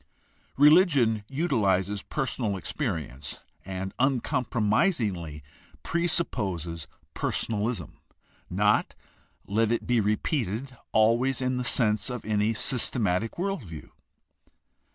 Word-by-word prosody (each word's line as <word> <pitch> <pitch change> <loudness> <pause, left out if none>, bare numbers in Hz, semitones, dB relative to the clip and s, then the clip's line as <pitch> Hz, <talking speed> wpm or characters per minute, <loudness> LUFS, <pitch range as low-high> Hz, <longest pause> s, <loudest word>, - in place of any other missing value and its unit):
Religion 145 - +5
utilizes 105 - 0
personal 120 -8 -2
experience 80 - -4 0.2
and 95 0 -5
uncompromisingly 115 - 0 0.4
pre 170 +1 0
supposes 85 - -1 0.3
personalism 110 +1 -2 0.3
— - - -35 0.2
not, - - +2 0.5
let 110 +3 +1
it 120 - -1
be 120 -2 +2
repeated, 115 - -1 0.2
always 120 +5 +3
in 130 -1 -1
the 125 - -1
sense 110 -3 +2
of 125 -3 -5
any 105 0 +1
systematic 115 -3 +1
world 195 -1 -2
view. 80 -8 -10
115 Hz, 95 wpm, -27 LUFS, 100-130 Hz, 0.5 s, Religion